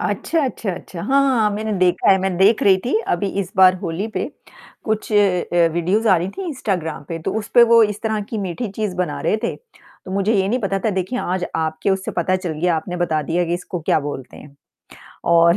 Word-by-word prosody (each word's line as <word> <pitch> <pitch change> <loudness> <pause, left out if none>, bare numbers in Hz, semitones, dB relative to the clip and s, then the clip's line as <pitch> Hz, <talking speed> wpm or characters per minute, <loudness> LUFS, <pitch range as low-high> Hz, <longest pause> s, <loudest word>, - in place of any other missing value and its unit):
अच्छा, 215 - -1
अच्छा, 230 -5 -3
अच्छा, 175 0 -9
हाँ, 270 +6 +3
हाँ, 265 -3 +2
हाँ, 210 -1 +3
मैंने 215 0 -3
देखा 180 -1 +3
है, 190 - +6
मैं 190 -1 -1
देख 200 +5 +4
रही 195 -2 +6
थी 255 - +1
अभी 175 +3 0
इस 185 - -6
बार 185 -1 +7
होली 175 +3 -3
पे - - -1 0.6
कुछ 220 0 -2
अ - - +4
अ, 180 -4 +3
वीडियोज़ 185 +7 +1
आ 185 - +6
रही 175 +2 -2
थीं 380 - -6
इंस्टाग्राम 190 - -3
पे, 165 - -4
तो 160 - -3
उस 210 - -7
पे 240 - +8
वो 230 -1 +7
इस 210 -1 0
तरह 220 -1 -1
की 225 - -3
मीठी 195 +4 -3
चीज़ 210 -2 -3
बना 175 -5 -2
रहे - - +1
थे। - - -1
तो 375 - -18
मुझे 200 +3 +1
ये 195 -1 +2
नहीं 245 +5 +1
पता 195 -2 -1
था 220 - +2
देखिए 190 +6 -2
आज 180 -3 -2
आपके 160 +4 -1
उससे 190 -1 -1
पता 185 +2 +1
चल 185 -3 -4
गया 175 -1 +2
आपने 175 +3 -4
बता 165 -3 0
दिया 170 +4 0
कि 170 0 -1
इसको 180 0 -5
क्या 155 - +1
बोलते 140 -3 -7
हैं? 140 -1 -14 0.7
और 170 +1 +5
190 Hz, 235 wpm, -20 LUFS, 175-215 Hz, 0.7 s, पे